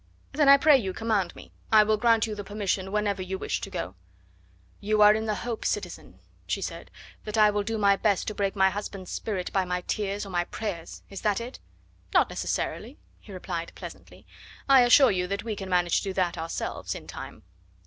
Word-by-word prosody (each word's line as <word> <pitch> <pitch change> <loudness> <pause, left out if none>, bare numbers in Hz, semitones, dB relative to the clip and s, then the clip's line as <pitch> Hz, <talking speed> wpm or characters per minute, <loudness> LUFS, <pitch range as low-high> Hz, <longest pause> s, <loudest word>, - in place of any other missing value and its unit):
"Then 290 -1 +3
I 280 - +10
pray 295 +1 +6
you 190 -5 -3
command 210 -4 -1
me. - - -13 0.2
I 215 -1 +7
will 215 +1 +2
grant 230 0 +3
you 220 - -4
the 205 -1 -6
permission 195 -2 -2
whenever 205 -2 0
you 190 +1 -4
wish - - -3
to - - -5
go." 90 - -5 0.9
"You 215 +1 0
are 210 0 +8
in 220 +1 -2
the 215 - 0
hope, 235 -2 -4
citizen," - - -4 0.3
she - - -1
said, - - -6 0.3
"that 215 0 -4
I 210 -1 +6
will 205 0 0
do 225 +2 -3
my 200 -2 +4
best 205 -3 +1
to 215 - -2
break 200 -1 -1
my 190 -1 +4
husband's 195 -2 -6
spirit 190 -5 -4
by 190 - +2
my 180 0 -2
tears 205 +2 -3
or 195 - -9
my 175 -1 0
prayers 175 -6 -6
is 195 - -7
that 210 -1 +1
it?" 240 +3 -8 0.6
"Not - - +5
necessarily," - - -3 0.2
he - - -14
replied - - -5
pleasantly. - - -11 0.4
"I 270 -2 +7
assure 250 +2 +6
you 180 -2 -1
that 200 +2 -3
we 220 -2 -3
can 195 -2 -7
manage 175 -2 +2
to - - -1
do - - -3
that 180 -2 0
ourselves, 165 - -4
in - - -9
time." - - -9
205 Hz, 210 wpm, -27 LUFS, 190-220 Hz, 0.9 s, I